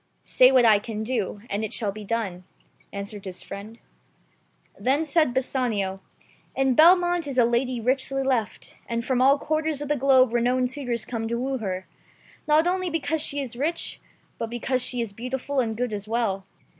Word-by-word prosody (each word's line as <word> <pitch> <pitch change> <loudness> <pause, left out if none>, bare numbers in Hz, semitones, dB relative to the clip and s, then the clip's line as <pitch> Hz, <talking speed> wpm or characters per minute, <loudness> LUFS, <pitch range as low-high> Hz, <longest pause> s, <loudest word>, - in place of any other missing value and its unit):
"Say 255 +1 +5
what 255 -2 +5
I 215 -2 +6
can 215 0 -5
do, 220 -4 -2
and 205 0 -2
it 215 - -4
shall 210 -3 -1
be 215 +1 -9
done," 200 -4 -3 0.5
answered 200 0 -7
his 185 -1 -7
friend. 205 +3 -9 1.0
Then 280 +5 +1
said 310 -2 +2
Bassanio, 240 -7 -1 0.6
"In 270 -1 +2
Belmont 350 +2 +5
is 270 -2 -4
a 245 - +6
lady 240 +1 0
richly 270 +3 0
left, 250 -5 -2
and 235 0 -2
from 255 -1 +1
all 275 +2 +5
quarters 310 0 -1
of 290 -1 -5
the 295 - +2
globe 260 -3 +4
renowned 250 +1 +1
suitors 245 -4 -3
come 225 -2 -4
to 235 +1 -2
woo 260 +2 -2
her, 190 -3 -4 0.6
not 305 +2 +4
only 365 0 0
because 320 -1 -1
she 285 -1 0
is 255 -3 -6
rich, 305 +7 -2 0.4
but 230 - -3
because 250 +2 -1
she 250 -1 +1
is 225 -4 -4
beautiful 255 +5 -3
and 225 -3 -1
good 245 -2 -2
as 205 0 -5
well. 210 -4 -1
250 Hz, 180 wpm, -25 LUFS, 220-275 Hz, 1.0 s, I